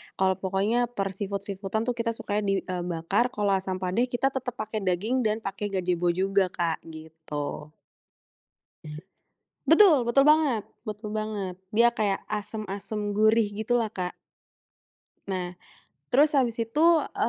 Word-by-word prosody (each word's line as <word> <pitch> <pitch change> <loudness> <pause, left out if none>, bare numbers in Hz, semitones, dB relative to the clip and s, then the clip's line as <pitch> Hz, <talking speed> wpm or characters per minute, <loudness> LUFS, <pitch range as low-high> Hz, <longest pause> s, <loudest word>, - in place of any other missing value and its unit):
kalau 190 0 +1
pokoknya 205 +6 +1
per 195 -5 -3
seafood-seafood-an 200 +1 -3
tuh 245 - 0
kita 230 0 -1
sukanya 210 -1 -2
di 195 - +3
e 185 - -4
bakar, 180 +8 +1
kalau 205 -1 +1
asam 190 -1 0
padeh 210 +8 +1
kita 260 +2 0
tetep 250 -2 -4
pake 215 -1 -4
daging 215 +6 0
dan 215 +1 -2
pake 200 +1 -3
gajebo 180 -3 -1
juga 190 +2 +2
Kak, 170 -2 -2
gitu 155 -1 -7 1.9
Betul 320 - +6
betul 275 +3 +5
banget 300 -7 +4 0.2
betul 210 0 -5
banget, 215 -4 -3 0.2
dia 235 +2 +5
kayak 205 -4 0
asem-asem 210 0 -4
gurih 215 +1 +4
gitu 220 +4 -1
lah 225 -2 -1
Kak. 180 -1 -4 1.1
Nah, 180 -2 -3 0.5
terus 290 +4 +4
habis 250 -5 +2
itu 230 +8 0 0.3
e - - 0
210 Hz, 140 wpm, -27 LUFS, 190-230 Hz, 1.9 s, Betul